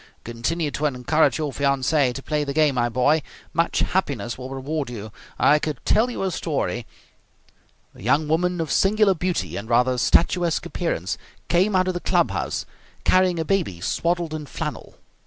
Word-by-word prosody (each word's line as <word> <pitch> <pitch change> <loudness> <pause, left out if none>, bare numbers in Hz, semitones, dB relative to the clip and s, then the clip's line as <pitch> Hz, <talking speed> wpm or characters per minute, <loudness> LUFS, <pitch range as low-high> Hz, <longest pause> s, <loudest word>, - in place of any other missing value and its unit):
Continue 145 +7 -2
to 150 +2 0
encourage 145 +4 +2
your 150 -3 -3
fiancee 140 0 +2
to 135 +2 -7
play 150 -1 -1
the 140 -1 -3
game, 155 -3 +4
my 120 -2 +1
boy. 135 +7 +2 0.3
Much 165 +1 +1
happiness 130 - -1
will 130 0 -8
reward 135 +1 -3
you. 110 -3 -7 0.3
I 150 +1 +5
could 150 -5 -3
tell 225 +4 +3
you 240 - -4
a 190 - 0
story 140 -8 -2 0.6
" - - -36
A - - -15
young 140 +8 +2
woman 175 +3 +1
of 160 -3 -2
singular 205 0 +4
beauty 180 0 -2
and 110 +3 -6
rather 125 +1 +3
statuesque 170 +4 +2
appearance 165 - -2 0.3
came 190 +4 +3
out 185 0 +3
of 185 - 0
the 175 - -3
club - - +2
house - - -2 0.4
carrying 185 -1 +3
a 160 - -1
baby 170 - 0
swaddled 170 - -1
in 150 -2 -5
flannel. - - -6
155 Hz, 175 wpm, -23 LUFS, 130-175 Hz, 0.6 s, I